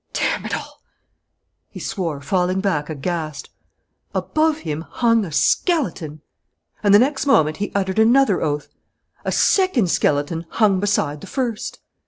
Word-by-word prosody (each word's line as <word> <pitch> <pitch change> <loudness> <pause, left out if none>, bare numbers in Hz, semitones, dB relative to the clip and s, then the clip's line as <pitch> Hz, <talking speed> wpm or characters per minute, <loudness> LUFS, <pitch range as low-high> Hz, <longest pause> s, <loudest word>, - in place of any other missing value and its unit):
"Damn - - -1
it - - -2
all!" - - -9 0.9
he - - -10
swore, 165 -8 -3
falling 180 +4 0
back 170 -7 -1
aghast. 155 0 -4 0.6
Above 310 0 +1
him 155 0 -4
hung 230 +5 +1
a 175 - -6
skeleton! 170 - 0 0.6
And 205 - +3
the 205 - +9
next 270 +5 +1
moment 155 - +3
he 205 - -3
uttered 190 0 0
another 235 -2 +4
oath. 150 -1 -2 0.6
A - - 0
second 290 - +2
skeleton 150 +3 0
hung 205 -4 +2
beside 160 -8 0
the - - -9
first! 245 -2 -3
190 Hz, 140 wpm, -21 LUFS, 155-230 Hz, 0.9 s, the